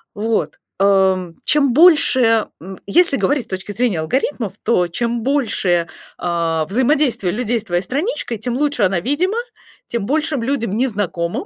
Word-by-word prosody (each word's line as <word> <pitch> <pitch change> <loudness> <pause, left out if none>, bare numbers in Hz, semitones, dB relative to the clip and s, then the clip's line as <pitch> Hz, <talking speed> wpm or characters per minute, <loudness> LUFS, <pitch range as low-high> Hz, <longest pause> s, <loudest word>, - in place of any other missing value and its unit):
Вот, 210 -8 -2 0.2
ам, 190 -3 +2
чем 280 -4 +3
больше 260 -8 +5
м. 190 +2 -9
Если 335 - +3
говорить 280 -5 0
с - - -31
точки 190 +2 -5
зрения 220 -6 0
алгоритмов, 225 - -2
то 180 -6 +2
чем 235 +4 -2
больше, 200 -11 0 0.3
а, 165 -2 -1
взаимодействие 255 - +1
людей 240 0 -1
с - - -7
твоей 175 -2 -1
страничкой, 270 - -3
тем 235 +3 -4
лучше 285 -5 0
она 190 -1 +2
видима, 345 - -1 0.5
тем 235 -4 -3
большим 295 -2 0
людям, 235 -6 -1
незнакомым, 205 - -2
230 Hz, 145 wpm, -18 LUFS, 190-275 Hz, 0.5 s, больше